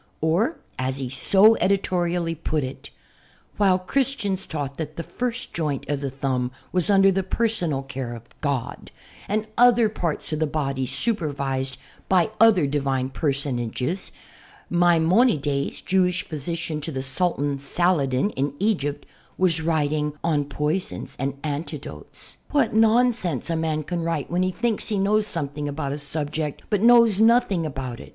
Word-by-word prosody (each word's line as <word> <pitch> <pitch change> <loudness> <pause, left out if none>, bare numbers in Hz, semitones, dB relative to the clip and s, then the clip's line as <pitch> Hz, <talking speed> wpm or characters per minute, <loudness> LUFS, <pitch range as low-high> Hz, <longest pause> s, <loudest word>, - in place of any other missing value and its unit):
Or 180 - +1 0.2
as 130 +1 -1
he 130 -2 -4
so 195 - +5
editorially 175 -3 0
put 155 -2 -2
it 130 +1 -7 0.7
"while 195 -3 +4
Christians 205 -2 -1
taught 140 -3 -4
that 155 -1 -5
the 165 - -4
first 250 +4 -4
joint 150 -5 -2
of 145 -1 -2
the 140 - -2
thumb 130 -2 -1 0.2
was 180 -1 +1
under 195 -1 +6
the 195 +1 +1
personal 185 -8 0
care 130 -2 -5
of 115 - -10 0.2
God 140 -5 -3 0.4
and 215 +1 0
other 240 -2 +6
parts 170 -6 -3
of 155 - -1
the 155 - +1
body 135 -3 -2
supervised 140 - 0 0.3
by 185 +1 +3
other 220 -8 +6
Divine 135 -2 -1
personages, 140 - -2 0.6
Maimonides, 170 - +2
Jewish 180 -1 +1
physician 160 0 -4
to 160 - -3
the 130 -2 -4
Sultan 145 -1 0
Saladin, 140 +1 +1
in 140 -2 -2
Egypt, 170 -8 -1 0.3
was 170 -4 +2
writing 150 -2 0
" - - -38
*On 150 -3 +1
Poisons 150 +6 -3
and 135 +1 -2
Antidotes.' 150 +1 -6
" - - -39
What 285 -8 +2
nonsense 220 - +2
a - - 0
man 160 -1 -1
can 175 +2 -3
write 165 -3 -2
when 175 +1 +1
he 185 0 +1
thinks 225 +3 -1
he 210 - 0
knows 210 +2 +2
something 145 -3 -2
about 145 -1 -3
a 145 - -4
subject 150 +1 -3
but 205 -2 +2
knows 230 -3 +6
nothing 220 -7 +3
about 130 -4 -5
it. - - -11
160 Hz, 155 wpm, -24 LUFS, 140-195 Hz, 0.7 s, under